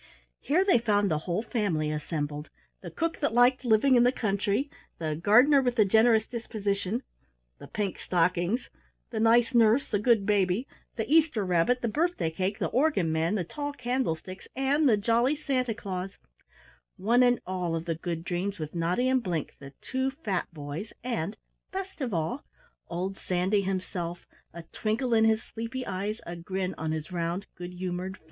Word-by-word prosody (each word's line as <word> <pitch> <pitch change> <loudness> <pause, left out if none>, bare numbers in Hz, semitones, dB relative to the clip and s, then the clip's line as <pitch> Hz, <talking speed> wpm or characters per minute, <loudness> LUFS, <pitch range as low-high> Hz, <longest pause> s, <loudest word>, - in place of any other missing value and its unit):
Here 340 +8 +2
they 375 -11 +5
found 205 -4 +2
the 155 - +1
whole 175 +6 0
family 180 -11 -1
assembled: 150 -1 -4 0.3
the - - -7
Cook 330 0 -2
that 260 -6 0
liked 250 +2 +5
living 240 +3 +4
in 245 - +6
the 245 +1 +5
Country, 205 +3 0 0.3
the 155 -2 -2
Gardener 245 - +5
with 245 -2 0
the 215 -4 +5
Generous 220 +2 +4
Disposition, 215 -1 -3 0.6
the - - -10
Pink 205 -3 -3
Stockings, 180 +6 0 0.4
the 225 - -2
Nice 230 +3 +4
Nurse, 235 +3 +4
the 205 - 0
Good 220 -2 +3
Baby, 200 +3 +1 0.3
the 225 - -2
Easter 300 -9 +3
Rabbit, 180 +8 +2
the - - +2
Birthday 300 - 0
Cake, 185 +5 -2
the - - -1
Organ 250 - +2
Man, 165 +5 +1
the 190 - 0
Tall 290 - -5
Candlesticks, 240 - -3
and 275 +2 +2
the 215 - +4
Jolly 235 +7 +2
Santa 255 -6 -1
Claus 190 -2 -5 0.8
one 235 +6 +3
and 245 -1 +4
all 180 -3 -2
of 165 0 -4
the 170 - 0
Good 165 0 -4
Dreams, 185 +3 -2
with 155 -2 -6
Noddy 175 +9 +1
and 260 0 +3
Blink, 170 -8 -3
the 140 0 -11
two 260 0 -1
fat 215 - -3
boys, 155 +6 -6
and 220 -5 -2 0.3
best 385 -3 -6
of 255 -4 -1
all 170 - -2 0.5
old 185 +3 -3
Sandy 185 +3 +1
himself, 185 -2 -4 0.3
a 170 0 -9
twinkle 230 +3 -1
in 220 0 +5
his 220 0 +2
sleepy 240 +3 -5
eyes, 205 +4 -3
a 170 - -6
grin 185 +2 -3
on 160 -1 -3
his 160 +2 -4
round 175 +2 -2
good 175 0 -7
humored 180 +1 -4
face. - - -30
205 Hz, 175 wpm, -28 LUFS, 175-245 Hz, 0.8 s, in